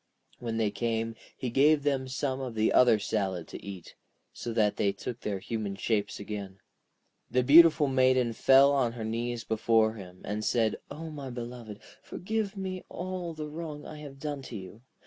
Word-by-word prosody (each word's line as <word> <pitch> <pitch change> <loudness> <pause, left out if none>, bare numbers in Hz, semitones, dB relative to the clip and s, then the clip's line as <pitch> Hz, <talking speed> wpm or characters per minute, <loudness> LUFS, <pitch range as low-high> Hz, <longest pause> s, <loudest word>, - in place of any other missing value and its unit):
When 115 -2 -3
they 110 -2 +1
came 115 0 -1 0.2
he 125 -3 -3
gave 145 +3 +4
them 135 -2 0
some 130 0 -2
of 125 -3 -5
the 110 0 +2
other 125 -3 +6
salad 95 -5 -2
to - - -9
eat, 95 -4 -8 0.4
so 120 - -5
that 110 -2 +2
they 100 - +2
took 120 +3 -6
their 105 -4 -2
human 105 0 -4
shapes 105 0 -1
again. 100 -2 -6 0.7
The 125 0 +2
beautiful 155 +2 +7
Maiden 130 -2 +3
fell 135 +4 +6
on 130 -5 +1
her 115 -2 -5
knees 115 +1 -2
before 110 0 +2
him, 90 -4 -11
and 105 +1 -3
said: 110 -1 +1
'O 160 +2 -7
my 140 -3 -6
beloved, 120 -3 -7 0.2
forgive 215 +1 -3
me 185 -1 -4
all 180 -2 -5
the 155 -1 -5
wrong 150 -1 -7
I 155 - -8
have 145 -2 -9
done 145 -1 -4
you. 105 -1 -8
120 Hz, 175 wpm, -29 LUFS, 110-145 Hz, 0.7 s, beautiful